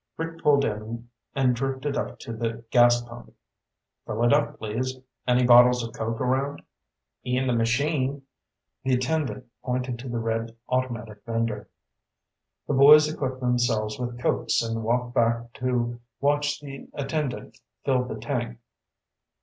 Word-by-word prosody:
Rick 165 0 -5
pulled 140 -1 +4
in 110 +2 -4 0.3
and 130 -3 +3
drifted 135 +3 -2
up - - -3
to 115 - -6
the 115 0 -4
gas 120 -1 +5
pump. 120 0 -12 0.7
"Fill 110 +2 -1
it 120 - +5
up, 145 0 +1
please. 125 +4 -3 0.3
Any 125 0 +4
bottles 125 0 +7
of 115 0 -6
Coke 115 0 -3
around?" 135 +3 -1 0.6
"In 125 +1 0
the 125 - +1
machine." 135 +4 0 0.6
The 130 -1 +2
attendant 130 0 -1 0.2
pointed 125 -1 -2
to 130 +1 -7
the 120 - -2
red 115 0 -2
automatic 115 -5 -2
vendor. 115 -2 -2 1.0
The - - 0
boys 150 +3 +7
equipped 130 -3 -3
themselves 120 -3 0
with 120 -1 -4
Cokes 120 - +1
and 115 0 -2
walked 120 +2 0
back 115 0 +1
to 120 -2 -1 0.2
watch 145 +1 +1
the 140 -2 -9
attendant 140 -1 -3 0.3
fill 130 -2 +2
the 110 - -5
tank. 120 +1 -3
125 Hz, 140 wpm, -26 LUFS, 115-135 Hz, 1.0 s, bottles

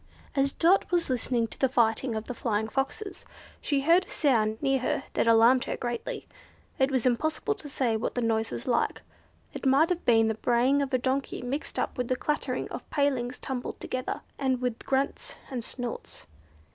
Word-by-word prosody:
As 275 0 +2
Dot 355 +6 +3
was 345 -5 +1
listening 245 -1 0
to - - -11
the 265 - +3
fighting 235 0 +2
of 220 - -2
the 250 - -5
Flying 220 -2 -1
Foxes, 285 - -3 0.4
she 285 -2 +1
heard 340 +6 +4
a - - -18
sound 220 -7 +2
near 270 -1 +2
her 255 - -1
that - - +1
alarmed 230 +3 +6
her - - -3
greatly. 240 -1 -4 0.5
It 265 0 +4
was 260 -3 0
impossible 310 - +1
to 300 -8 -9
say 250 -5 0
what 220 - -2
the 245 - 0
noise 225 -1 +1
was 235 - -6
like. 240 -2 0 0.5
It - - -7
might 275 +5 +5
have 360 -1 -1
been 225 -2 +4
the 220 - +1
braying 245 +5 +2
of 280 -1 -2
a 255 - +3
donkey 260 +1 -2
mixed 270 +5 -4
up - - -2
with 250 - 0
the 255 - +1
clattering 300 +4 -2
of - - -8
palings 260 -4 0
tumbled 255 -2 -5
together, 255 0 -3 0.2
and 260 -2 +1
with 250 -2 -3
grunts 270 +1 -1 0.2
and 245 -3 -3
snorts. 245 0 -6
255 Hz, 195 wpm, -28 LUFS, 235-280 Hz, 0.5 s, alarmed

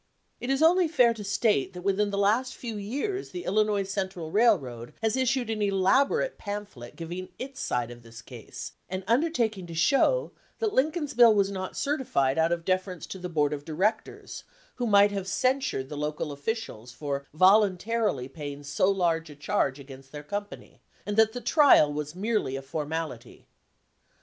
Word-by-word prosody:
It 245 - -5
is 270 +3 +2
only 350 +2 +5
fair 250 -7 +4
to 215 -2 -8
state 200 - +1
that 180 0 -8
within 200 +1 +1
the 200 - -3
last 220 +6 +1
few 230 -3 -6
years 285 - -3
the 355 - -6
Illinois 210 0 +1
Central 190 -5 -4
Railroad 140 - +1
has 220 +1 +1
issued 260 -2 0
an 215 -1 -3
elaborate 265 - +2
pamphlet 205 - -7
giving 175 +3 -6
its 270 +1 -7
side 120 -1 -1
of 120 0 -11
this 115 0 -13
case, 120 -3 -9 0.2
and 185 +1 -4
undertaking 230 - +1
to 165 - -8
show 275 - +2 0.3
that 440 -2 -1
Lincoln's 300 +2 0
bill 235 -2 +7
was 200 -1 +2
not 185 -1 -5
certified 200 - 0
out 165 +1 +3
of 170 -1 -2
deference 185 -3 -1
to 190 - -8
the 180 0 -5
board 150 -3 +1
of 145 -1 -5
directors, 185 +8 -2 0.3
who 245 - -1
might 205 -1 +5
have 195 -2 -4
censured 255 - 0
the 150 - -6
local 150 +1 -3
offi 145 +11 -2
cials 125 - -9
for 140 +1 -4
voluntarily 195 - +3
paying 145 -1 -8
so 145 +7 +1
large 170 -4 0
a 150 - -11
charge 145 -3 -1
against 135 -1 -12
their 145 -1 -8
company, 205 +6 -7 0.2
and 205 - -3
that 220 0 +4
the 245 - -5
trial 280 - +5
was 150 +2 -5
merely 205 - -1
a 135 - -5
formality. 150 -2 -5
195 Hz, 175 wpm, -27 LUFS, 150-230 Hz, 0.3 s, bill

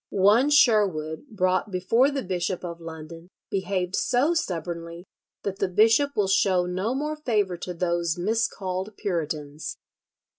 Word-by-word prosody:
"One 210 +8 +4
Sherwood 205 - +3
brought 185 -1 0
before 225 +8 +2
the 275 -2 -3
Bishop 180 0 -2
of 170 -1 -7
London 165 +1 -9 0.2
behaved 190 -1 -1
so 270 +7 +2
stubbornly 170 - -4 0.4
that 195 0 -4
the 195 - +1
bishop 225 +9 +3
will 205 -2 +2
show 190 -2 +3
no 185 +7 -2
more 300 +3 -2
favour 210 -10 0
to 180 +1 -5
those 170 -1 0
miscalled 195 -1 -2
Puritans." 155 -6 -4
185 Hz, 135 wpm, -25 LUFS, 170-220 Hz, 0.4 s, One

